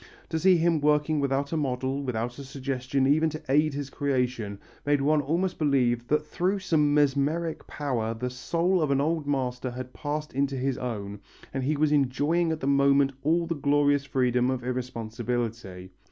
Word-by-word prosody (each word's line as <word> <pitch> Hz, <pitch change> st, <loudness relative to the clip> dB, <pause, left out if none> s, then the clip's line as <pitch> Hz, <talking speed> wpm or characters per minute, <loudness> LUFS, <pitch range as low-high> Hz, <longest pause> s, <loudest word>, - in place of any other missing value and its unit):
To 160 Hz, -, -1 dB
see 185 Hz, +1 st, +5 dB
him 165 Hz, -2 st, +2 dB
working 150 Hz, +1 st, +2 dB
without 140 Hz, 0 st, 0 dB
a 165 Hz, -, 0 dB
model, 135 Hz, -1 st, -1 dB
without 120 Hz, -1 st, -3 dB
a -, -, -6 dB
suggestion 135 Hz, 0 st, -2 dB
even 155 Hz, +4 st, +3 dB
to 155 Hz, +1 st, -7 dB
aid 150 Hz, +2 st, +2 dB
his 140 Hz, -1 st, -5 dB
creation, 125 Hz, -7 st, -1 dB, 0.3 s
made 145 Hz, 0 st, +2 dB
one 150 Hz, +2 st, +3 dB
almost 170 Hz, +6 st, -1 dB
believe 125 Hz, -5 st, +1 dB
that 150 Hz, +1 st, +1 dB
through 185 Hz, +6 st, 0 dB
some 160 Hz, -6 st, +2 dB
mesmeric 150 Hz, +3 st, +1 dB
power 120 Hz, -6 st, -2 dB
the 125 Hz, +2 st, -3 dB
soul 170 Hz, +8 st, 0 dB
of 155 Hz, -, +1 dB
an 140 Hz, -1 st, +2 dB
old 155 Hz, +1 st, 0 dB
master 130 Hz, -2 st, -1 dB
had 125 Hz, +1 st, -7 dB
passed 150 Hz, +1 st, -4 dB
into 140 Hz, +1 st, 0 dB
his 130 Hz, 0 st, -1 dB
own, 105 Hz, -5 st, -5 dB, 0.3 s
and 135 Hz, -, -2 dB
that 130 Hz, -, -2 dB
he 150 Hz, 0 st, +1 dB
was 150 Hz, 0 st, +2 dB
enjoying 150 Hz, +5 st, +2 dB
at 160 Hz, -, -3 dB
the -, -, -2 dB
moment 140 Hz, 0 st, +4 dB
all 165 Hz, +4 st, +2 dB
the 165 Hz, -, -1 dB
glorious 145 Hz, -1 st, +2 dB
freedom 125 Hz, -2 st, +1 dB
of 130 Hz, -2 st, -2 dB
irresponsibility. 115 Hz, -5 st, -4 dB
140 Hz, 180 wpm, -27 LUFS, 125-150 Hz, 0.3 s, see